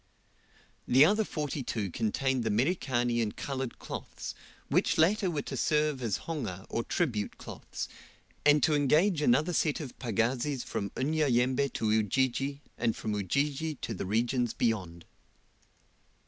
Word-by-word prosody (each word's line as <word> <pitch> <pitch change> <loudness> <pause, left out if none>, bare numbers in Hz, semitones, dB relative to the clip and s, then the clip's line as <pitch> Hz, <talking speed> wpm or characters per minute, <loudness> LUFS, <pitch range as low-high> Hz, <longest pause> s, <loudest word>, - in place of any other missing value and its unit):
The 135 +4 +7
other 210 +6 +3
forty 150 -6 -3
two 105 -6 -3
contained 125 +4 0
the 110 - 0
Merikani 120 - +1
and 105 -2 -2
coloured 135 -3 -4
cloths, - - -6 0.3
which - - +2
latter 190 +4 +3
were 150 -4 -2
to - - -5
serve 150 -3 +1
as 115 -5 -1
honga 110 - -4
or 115 - -1
tribute 115 -12 -1
cloths, - - -7 0.6
and 145 -1 +5
to 155 - +4
engage 150 +5 +3
another 150 +6 +3
set 155 -1 +1
of 145 -6 -8
pagazis 120 +3 0
from 100 - -3
Unyanyembe 135 -2 +2
to 110 -1 0
Ujiji, 130 +6 +1 0.2
and 115 - +1
from 110 - -3
Ujiji 140 - -1
to - - -5
the - - -4
regions 120 +3 0
beyond. 90 -8 -1
130 Hz, 140 wpm, -30 LUFS, 115-150 Hz, 0.6 s, The